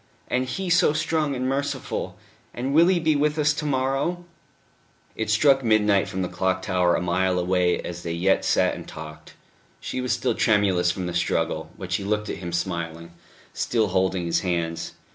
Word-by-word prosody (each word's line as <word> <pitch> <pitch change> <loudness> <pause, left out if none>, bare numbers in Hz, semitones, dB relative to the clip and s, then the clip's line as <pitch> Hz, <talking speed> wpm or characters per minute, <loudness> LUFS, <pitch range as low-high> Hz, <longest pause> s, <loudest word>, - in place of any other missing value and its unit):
And 125 +1 +1
He 185 +7 -3
so 170 -3 +4
strong 155 -2 0
and 130 0 -2
merciful. 140 +2 -3 0.4
And 130 +3 -2
will 165 +3 +6
He 185 -1 +3
be 160 -2 +2
with 150 +1 +1
us 150 -1 +3
to 150 0 -4
morrow?" 135 +6 -1 0.9
It 110 -1 -3
struck 135 +5 +4
midnight 105 -3 +3
from 95 -2 -3
the - - -1
clock 95 +1 -1
tower 90 -2 +2
a - - -1
mile 90 +1 +1
away 90 0 +1
as 85 0 -6
they 85 -1 -4
yet 90 +3 +2
sat - - +2
and - - -8
talked. 75 -1 -10 0.4
She 130 - -4
was 125 -2 -2
still 125 +1 +1
tremulous 100 -5 +2
from 90 +1 -2
the 90 - -4
struggle; 80 -2 -1
but 95 -3 -8
she 95 +2 0
looked 105 +1 -1
at - - -5
him 85 -2 -5
smiling, 85 -1 -3 0.4
still 110 -4 0
holding 95 -1 0
his 85 - +1
hands. 85 -3 -2
100 Hz, 185 wpm, -24 LUFS, 90-135 Hz, 0.9 s, will